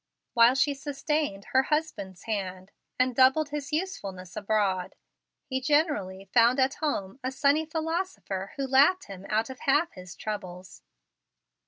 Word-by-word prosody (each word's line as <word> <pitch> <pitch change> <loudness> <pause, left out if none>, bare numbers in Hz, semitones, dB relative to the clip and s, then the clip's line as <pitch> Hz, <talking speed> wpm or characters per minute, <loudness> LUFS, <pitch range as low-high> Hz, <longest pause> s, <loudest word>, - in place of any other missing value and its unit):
While 235 +1 +6
she 280 +2 +2
sustained 285 -6 -2
her 260 - +5
husband's 265 - -2
hands 190 -3 -4 0.3
and 255 -1 +2
doubled 270 +4 +4
his 290 0 -5
usefulness 200 - -4
abroad, 200 -3 0 0.5
he 260 0 -2
generally 255 - +1
found 240 +2 +5
at 265 +1 +3
home 260 -7 -3
a 255 - -1
sunny 285 +4 +2
philosopher 320 - -3
who 275 - -2
laughed 280 +8 +4
him 195 0 -10
out 220 +4 0
of 260 - -10
half 295 +5 +2
his 180 -1 -11
troubles. 185 -4 -7
260 Hz, 140 wpm, -28 LUFS, 195-295 Hz, 0.5 s, While